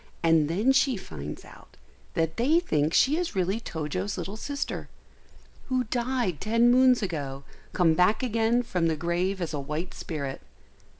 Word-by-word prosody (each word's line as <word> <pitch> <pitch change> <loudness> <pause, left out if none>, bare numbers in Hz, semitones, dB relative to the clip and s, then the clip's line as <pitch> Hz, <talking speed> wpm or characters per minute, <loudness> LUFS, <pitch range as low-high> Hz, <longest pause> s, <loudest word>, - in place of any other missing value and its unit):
and 165 -2 +4
then 205 +10 +2
she 270 -3 +3
finds 75 - -8
out - - -16 0.4
that 165 -1 0
they 285 +8 +4
think 155 - 0
she 280 - +4
is 350 -8 -2
really 190 +3 0
Tojo's 185 +1 -4
little 195 - -5
sister, 280 +5 -4 0.8
who 255 -1 +1
died 240 - -1
ten 230 +2 +3
moons 255 -2 +5
ago, 140 -7 -4 0.3
come 170 -3 +3
back 180 +9 +3
again 230 0 +1
from 180 -8 0
the 160 - +1
grave 175 +4 -1
as 170 -3 -3
a 145 - -2
white 150 +6 -4
spirit. 140 -5 -5
190 Hz, 160 wpm, -27 LUFS, 160-240 Hz, 0.8 s, moons